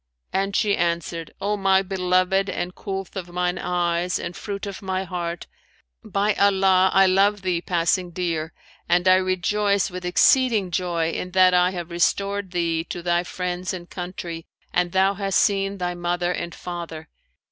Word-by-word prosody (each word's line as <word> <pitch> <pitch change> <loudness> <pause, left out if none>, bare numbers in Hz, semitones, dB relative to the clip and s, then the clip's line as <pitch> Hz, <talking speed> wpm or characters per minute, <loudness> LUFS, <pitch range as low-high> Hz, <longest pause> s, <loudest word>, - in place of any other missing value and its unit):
and 195 +1 0
she 205 -2 +2
answered 170 -1 -2
'O 205 +2 0
my 195 -1 +3
beloved 185 +1 +1
and 175 +1 -3
coolth 195 -1 -6
of 180 -2 -5
mine 180 0 -1
eyes 175 0 0
and 175 - -6
fruit 200 -1 -5
of 195 -3 -7
my 190 -1 -2
heart, 175 -2 -4 0.6
by 205 +1 0
Allah, 190 -2 +4
I 195 0 +5
love 195 +2 +3
thee 180 -2 0
passing 175 +1 0
dear 165 -3 -2 0.4
and 175 +1 +3
I 185 0 +7
rejoice 195 +2 +1
with 180 0 -6
exceeding 210 +2 +3
joy 170 -2 0
in 180 - -4
that 185 -1 +5
I 180 0 +4
have 175 -2 -6
restored 200 +3 0
thee 170 -2 -1
to 175 - -6
thy 175 0 +1
friends 180 +1 -3
and 175 -1 -9
country 175 -2 -6 0.3
and 175 0 +1
thou 190 +2 +3
hast 195 -1 -1
seen 195 0 +1
thy 180 -1 -2
mother 175 0 -1
and 170 -1 -4
father. 170 -3 -7
180 Hz, 165 wpm, -23 LUFS, 175-195 Hz, 0.6 s, I